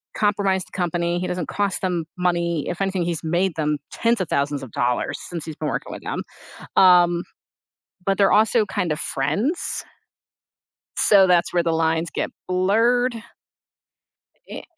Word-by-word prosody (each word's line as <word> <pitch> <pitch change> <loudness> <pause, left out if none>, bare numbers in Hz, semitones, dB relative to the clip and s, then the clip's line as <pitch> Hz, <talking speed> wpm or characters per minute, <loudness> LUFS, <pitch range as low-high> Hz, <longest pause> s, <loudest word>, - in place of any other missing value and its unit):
compromise 200 -3 +1
the - - -21
company, 175 -1 -1
he 180 - -2
doesn't 180 -3 -3
cost 200 -2 -1
them 180 -3 -1
money, 170 -3 0
if 175 - -4
anything, 190 -2 0
he's 170 -2 -3
made 175 +3 0
them 150 -1 0
tens 230 -2 +1
of 180 - -3
thousands 140 0 0
of 130 - -9
dollars 125 +4 -1
since 170 -3 -5
he's 160 - -7
been 155 - -4
working - - -4
with - - -8
them. - - -3 0.5
Um, 175 -2 +5 0.8
but 195 - +2
they're 200 - +4
also 220 +1 +4
kind 175 -4 -1
of 150 - -3
friends, 180 - -1 1.1
so 195 -2 +6
that's 175 -1 +3
where 175 - +2
the 165 - +1
lines 160 0 0
get - - -2 0.2
blurred. 225 +7 +2 1.3
E - - -7
175 Hz, 160 wpm, -22 LUFS, 160-195 Hz, 1.3 s, so